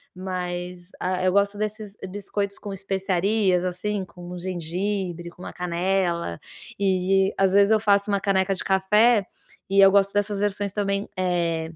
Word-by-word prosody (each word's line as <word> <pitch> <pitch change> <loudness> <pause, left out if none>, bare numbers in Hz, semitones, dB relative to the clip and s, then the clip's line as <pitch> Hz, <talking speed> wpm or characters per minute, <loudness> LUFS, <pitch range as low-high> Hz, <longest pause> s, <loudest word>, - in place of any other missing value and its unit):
mas, 180 -1 -5
ah, 185 0 -1
eu 185 - +3
gosto 200 +1 +2
desses 215 -1 -4
biscoitos 200 +1 -3
com 205 - -6
especiarias, 195 0 +1
assim, 190 +3 -2
com 175 -1 -12
o 180 - -6
gengibre, 180 0 -3
com 180 +1 -14
uma - - -7
canela, 175 - -1 0.4
e 195 0 +2
às 190 -1 +3
vezes 200 +1 +5
eu 220 - +5
faço 200 -1 +2
uma 200 - +2
caneca 195 -1 +1
de - - -4
café, 210 +4 +4 0.5
e 195 +1 +3
eu 195 0 +8
gosto 200 0 +3
dessas 205 0 0
versões 205 -1 -1
também, 200 -1 -1
eh, 170 -3 0
195 Hz, 160 wpm, -24 LUFS, 180-200 Hz, 0.5 s, eu